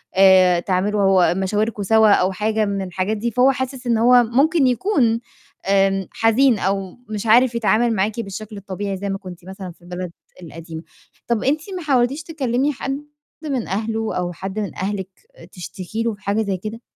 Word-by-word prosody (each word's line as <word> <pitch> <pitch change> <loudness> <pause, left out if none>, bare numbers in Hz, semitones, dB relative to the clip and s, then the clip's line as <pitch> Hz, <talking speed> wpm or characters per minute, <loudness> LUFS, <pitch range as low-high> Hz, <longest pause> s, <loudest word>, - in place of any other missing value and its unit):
آآ، 185 -2 +6
تعملوا 190 -1 +2
مشاوركم 205 +3 -1
سوا 220 +2 +4
أو 185 0 +2
حاجة 215 +3 0
من 200 -1 -2
الحاجات 190 +3 -2
دي. 235 +2 -2
فهو 250 +4 +4
حاسس 260 -1 -5
إن 235 - +2
هو 245 +2 +6
ممكن 275 +5 +2
يكون 245 - +1 0.5
آمم 195 -1 +2
حزين 225 0 +3
أو 195 -1 -2
مش 210 0 -4
عارف 240 +2 +5
يتعامل 235 +1 +2
معاكِ 210 +4 -1
بالشكل 215 0 -6
الطبيعي 200 0 -5
زي 200 +1 -4
ما 195 - -2
كنتِ 180 -2 -11
مثلًا 190 -1 -8
في 175 - -22
البلد 180 0 -6 0.3
القديمة، 165 -1 -9 0.4
طَب 235 -2 0
أنتِ 295 +4 +1 0.2
ما 360 - -5
حاولتيش 275 +1 +1
تكلمي 280 -3 -1
حد 275 +2 -5 0.4
من 270 -7 -2
أهله 220 +2 -2
أو 175 -1 -2
حد 195 +4 -5
من 205 - -4
أهلِك 190 0 -3 0.4
تشتكي 185 +4 -6
له 230 -1 -1
في 205 - -15
حاجة 200 +3 0
زي 195 -3 -2
كده؟ 215 +5 -7
210 Hz, 175 wpm, -20 LUFS, 190-240 Hz, 0.5 s, آآ